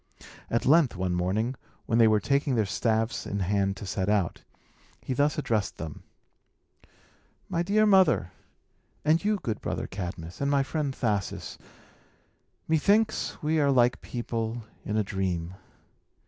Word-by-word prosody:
At 115 Hz, -, 0 dB
length, 150 Hz, -3 st, +4 dB
one 90 Hz, -1 st, -1 dB
morning, 95 Hz, +8 st, 0 dB, 0.3 s
when 115 Hz, 0 st, +1 dB
they 115 Hz, -, +7 dB
were 110 Hz, -1 st, +4 dB
taking 140 Hz, +2 st, +1 dB
their 110 Hz, -2 st, +2 dB
staffs 110 Hz, +4 st, -1 dB
in 100 Hz, 0 st, -2 dB
hand 100 Hz, +1 st, 0 dB
to 100 Hz, -, -7 dB
set 95 Hz, +1 st, -2 dB
out, 100 Hz, -5 st, 0 dB, 0.6 s
he -, -, -4 dB
thus 145 Hz, +3 st, +1 dB
addressed 110 Hz, -8 st, -1 dB
them: 80 Hz, -2 st, -7 dB, 1.5 s
"My 170 Hz, -, -1 dB
dear 205 Hz, +4 st, +3 dB
mother, 190 Hz, -, +4 dB, 0.7 s
and 160 Hz, +3 st, +3 dB
you 210 Hz, 0 st, +2 dB
good 110 Hz, -3 st, -3 dB
brother -, -, -3 dB
Cadmus, 90 Hz, -1 st, -6 dB
and 140 Hz, -, +1 dB
my 140 Hz, -1 st, +3 dB
friend 145 Hz, 0 st, -2 dB
Thasus, 100 Hz, -7 st, -2 dB, 1.1 s
methinks 205 Hz, +8 st, +2 dB
we 155 Hz, +1 st, +2 dB
are 145 Hz, -1 st, +3 dB
like 125 Hz, -2 st, +3 dB
people 115 Hz, -1 st, -4 dB, 0.2 s
in 105 Hz, -, -2 dB
a 110 Hz, -, +2 dB
dream. 95 Hz, -4 st, -2 dB
115 Hz, 145 wpm, -27 LUFS, 95-145 Hz, 1.5 s, they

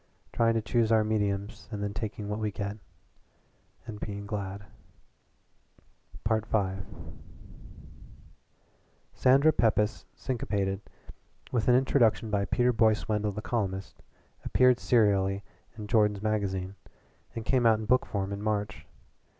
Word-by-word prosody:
Trying 115 Hz, 0 st, +2 dB
to 110 Hz, -, 0 dB
choose 115 Hz, -1 st, +1 dB
our 110 Hz, -1 st, +5 dB
mediums 105 Hz, -1 st, -2 dB
and 105 Hz, -2 st, -4 dB
then 100 Hz, 0 st, -3 dB
taking 105 Hz, -1 st, -5 dB
what 105 Hz, +1 st, -3 dB
we 110 Hz, -1 st, -1 dB
get 100 Hz, 0 st, -4 dB, 1.1 s
and 110 Hz, -3 st, -8 dB
being 100 Hz, -1 st, -5 dB
glad." 100 Hz, -1 st, -5 dB, 1.6 s
V 110 Hz, 0 st, +2 dB, 2.7 s
"Sandra 140 Hz, +5 st, +4 dB
Pepys, 105 Hz, 0 st, +1 dB
Syncopated," 100 Hz, -6 st, -2 dB, 0.7 s
with 120 Hz, -3 st, 0 dB
an 125 Hz, -, +6 dB
introduction 120 Hz, -4 st, +2 dB
by 100 Hz, -1 st, +1 dB
Peter 125 Hz, +3 st, +2 dB
Boyce 110 Hz, -1 st, +2 dB
Wendell 105 Hz, -1 st, 0 dB
the 105 Hz, +2 st, -6 dB
columnist, 95 Hz, -5 st, -3 dB, 0.4 s
appeared 125 Hz, -1 st, +4 dB
serially 100 Hz, -4 st, +2 dB, 0.3 s
in 105 Hz, -, -6 dB
JORDAN'S 105 Hz, -2 st, +2 dB
MAGAZINE, 100 Hz, -3 st, -1 dB, 0.6 s
and 115 Hz, -1 st, -5 dB
came 125 Hz, -1 st, +3 dB
out 110 Hz, -1 st, +5 dB
in 110 Hz, -, -5 dB
book 125 Hz, +4 st, +2 dB
form 100 Hz, -1 st, -3 dB
in 100 Hz, -, -5 dB
March. 105 Hz, 0 st, -2 dB
105 Hz, 125 wpm, -29 LUFS, 100-115 Hz, 2.7 s, an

